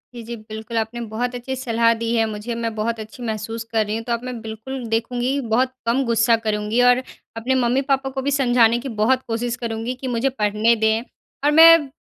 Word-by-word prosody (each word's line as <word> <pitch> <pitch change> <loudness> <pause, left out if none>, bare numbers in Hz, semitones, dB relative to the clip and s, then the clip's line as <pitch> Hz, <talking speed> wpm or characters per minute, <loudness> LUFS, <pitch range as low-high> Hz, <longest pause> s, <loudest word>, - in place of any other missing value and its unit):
जी, 240 - -7
जी। 235 +1 -6
बिल्कुल 220 +1 -7
आपने 225 +2 -2
बहुत 245 +3 -3
अच्छी 245 +2 -4
सलाह 230 -2 +2
दी 230 +1 -2
है 225 -1 +3
मुझे, 215 +3 -5
मैं 230 -1 -3
बहुत 225 +1 -2
अच्छी 220 +4 -9
महसूस 225 0 -4
कर 220 -2 +1
रही 210 +1 -3
हूँ। 225 - -4
तो 235 - -1
अब 235 +1 -3
मैं 250 -2 -5
बिल्कुल 225 +4 -6
देखूँगी, 245 +4 0
बहुत 255 +3 +2
कम 240 +4 +2
गुस्सा 230 0 +3
करूँगी 210 +2 0
और 245 +1 +4 0.3
अपने 255 +4 0
मम्मी-पापा 270 +2 +1
को 265 0 -4
भी 280 +2 -1
समझाने 240 -4 +3
की - - -3
बहुत 260 +4 +3
कोशिश 235 +1 -2
करूँगी 230 0 -4
कि 265 - -4
मुझे 245 +4 +1
पढ़ने 215 -1 +2
दें। 220 0 +1 0.4
और 295 - +5
मैं 325 -1 +8
235 Hz, 210 wpm, -21 LUFS, 225-255 Hz, 0.4 s, मैं